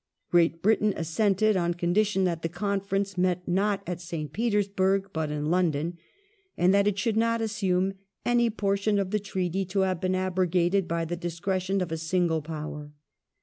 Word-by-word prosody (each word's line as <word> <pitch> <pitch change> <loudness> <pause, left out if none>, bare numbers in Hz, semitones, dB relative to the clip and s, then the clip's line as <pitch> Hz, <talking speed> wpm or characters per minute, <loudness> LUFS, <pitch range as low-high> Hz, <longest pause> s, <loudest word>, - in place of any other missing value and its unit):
Great 165 -1 +3
Britain 210 -1 +3
assented 195 +6 +2
on 175 -1 0
con 175 0 -1
dition 205 -2 +2
that 170 -2 -1
the 165 - -2
conference 195 +1 -2
met 180 0 0
not 195 +2 +1
at 175 0 -4
St. 165 -3 -5
Petersburg 195 -3 +1
but 160 -1 -1
in 150 0 -3
Lon 175 +2 +3
don, 160 +4 -3 0.6
and 180 +2 +4
that 200 0 +4
it 205 -1 +1
should 215 +2 0
not 230 +1 +2
assume 195 -4 0 0.2
*' - - -50
any 240 -1 +4
portion 200 -1 0
of 195 -1 -1
the 210 - +1
Treaty 190 -1 -2
to 190 +2 0
have 185 -2 0
been 185 0 +1
abrogated 185 0 +1
by 165 0 -1
the 175 +2 -3
discretion 185 +3 -2
of 175 -3 -3
a 165 - -1
single 165 0 0
Power 150 -1 -6
185 Hz, 185 wpm, -27 LUFS, 170-200 Hz, 0.6 s, and